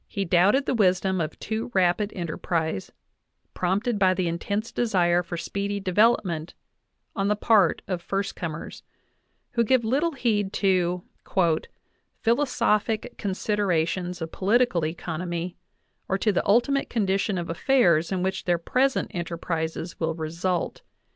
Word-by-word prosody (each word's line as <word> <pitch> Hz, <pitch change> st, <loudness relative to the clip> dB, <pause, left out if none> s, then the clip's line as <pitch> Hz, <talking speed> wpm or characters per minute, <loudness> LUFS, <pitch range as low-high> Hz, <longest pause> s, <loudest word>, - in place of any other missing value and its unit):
doubted 200 Hz, +11 st, +4 dB
the -, -, 0 dB
wisdom 190 Hz, -4 st, +2 dB
of 155 Hz, -, -4 dB
too 220 Hz, +2 st, -3 dB
rapid 190 Hz, +3 st, +2 dB
enterprise, 165 Hz, -, -2 dB, 0.6 s
prompted 205 Hz, +5 st, 0 dB
by 185 Hz, -1 st, +4 dB
the 185 Hz, -2 st, 0 dB
intense 200 Hz, +6 st, -2 dB
desire 180 Hz, -7 st, +2 dB
for 175 Hz, 0 st, -6 dB
speedy 200 Hz, +3 st, -3 dB
development 185 Hz, -4 st, +1 dB, 0.6 s
on 195 Hz, -1 st, 0 dB
the 210 Hz, -, +2 dB
part 205 Hz, -5 st, +3 dB
of 180 Hz, -3 st, -2 dB
first 195 Hz, +2 st, -2 dB
comers, 165 Hz, -2 st, -6 dB, 0.7 s
who 235 Hz, -, +2 dB
give 245 Hz, +1 st, +3 dB
little 290 Hz, +8 st, +1 dB
heed 215 Hz, -7 st, 0 dB
to 180 Hz, -3 st, +1 dB, 1.2 s
"philosophic 235 Hz, -2 st, +1 dB
considerations 185 Hz, -4 st, -1 dB
of 160 Hz, -, -6 dB
political 205 Hz, -3 st, +2 dB
economy 170 Hz, +2 st, -3 dB, 0.5 s
or 190 Hz, -, +2 dB
to 210 Hz, +2 st, +2 dB
the 195 Hz, -, 0 dB
ultimate 245 Hz, +6 st, +3 dB
condition 195 Hz, -2 st, 0 dB
of 170 Hz, -1 st, -3 dB
affairs 170 Hz, -, +3 dB
in 185 Hz, -1 st, -1 dB
which 190 Hz, 0 st, -2 dB
their 175 Hz, -1 st, +2 dB
present 255 Hz, +10 st, 0 dB
enterprises 165 Hz, -1 st, -3 dB
will 160 Hz, -1 st, -1 dB
result. 170 Hz, +3 st, -2 dB
190 Hz, 130 wpm, -25 LUFS, 175-215 Hz, 1.2 s, doubted